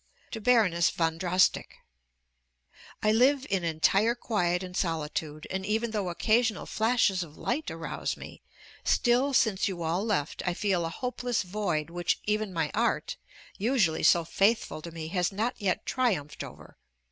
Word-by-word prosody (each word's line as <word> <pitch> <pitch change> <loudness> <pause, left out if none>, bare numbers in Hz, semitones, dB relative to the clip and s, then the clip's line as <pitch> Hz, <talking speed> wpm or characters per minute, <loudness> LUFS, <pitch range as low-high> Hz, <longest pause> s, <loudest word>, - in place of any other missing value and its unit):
TO 225 - -5
BARONESS 205 -8 +4
VON 165 -1 -1
DROSSDICK 180 +1 +2 1.3
I 215 - +4
live 260 +5 +3
in 190 -3 +1
entire 195 +8 +2
quiet 180 -7 0
and 180 -1 -8
solitude; 155 -3 -2
and 190 0 -2
even 220 +3 -1
though 205 -4 -2
occasional 220 +4 +1
flashes 220 -4 +2
of 155 -3 -8
light 275 +2 -2
arouse 165 0 -4
me, - - -11 0.4
still 250 +3 +2
since 220 -7 +2
you 180 -4 -4
all 170 +4 0
left, 200 -9 -1
I 180 -1 -1
feel 185 -5 0
a - - -4
hopeless 245 +3 -2
void 175 -5 -2
which 175 0 -1
even 210 -1 0
my 160 -4 -1
art, 235 +3 0 0.4
usually 210 -7 +2
so 170 -1 +4
faithful 195 -1 +1
to 170 - -7
me, 160 -1 -7
has 180 +1 0
not 220 +6 -1
yet 190 -3 0
triumphed 190 - -1
over. - - -12
190 Hz, 155 wpm, -28 LUFS, 170-225 Hz, 1.3 s, BARONESS